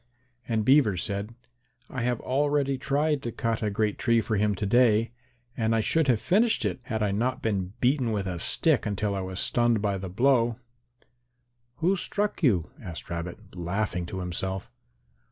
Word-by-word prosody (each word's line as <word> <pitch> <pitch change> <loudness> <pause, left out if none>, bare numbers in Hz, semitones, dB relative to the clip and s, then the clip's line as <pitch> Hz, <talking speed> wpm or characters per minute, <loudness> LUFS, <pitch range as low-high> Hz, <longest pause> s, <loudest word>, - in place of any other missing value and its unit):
And 110 -3 0
Beaver 130 -8 +4
said, 100 +5 -3 0.5
"I 125 - -5
have 120 0 0
already 140 0 +1
tried 145 +2 0
to 120 - -4
cut 115 -1 -2
a 105 - 0
great 105 +1 -1
tree 115 -1 +3
for 110 -1 -1
him 105 0 +1
to 105 - -3
day 115 0 +3 0.4
and 115 -1 +1
I 110 - +2
should 160 +7 +2
have 120 -4 +3
finished 220 - +2
it - - -2
had 110 -3 -2
I 105 - +1
not 120 +5 -1
been 95 -4 -1
beaten 125 -2 +2
with 100 -3 -1
a 90 -2 -3
stick 150 - +2
until 105 0 -1
I 95 - -2
was 95 0 -4
stunned 120 -2 +2
by 100 -2 -1
the 95 0 -6
blow." 120 +2 +2 1.2
"Who 180 +4 +2
struck 205 +3 -2
you?" 100 - +2
asked 85 -2 -8
Rabbit, 90 +4 -6
laughing 90 0 -2
to 95 +1 -5
himself. 95 +2 -4
110 Hz, 175 wpm, -27 LUFS, 100-130 Hz, 1.2 s, Beaver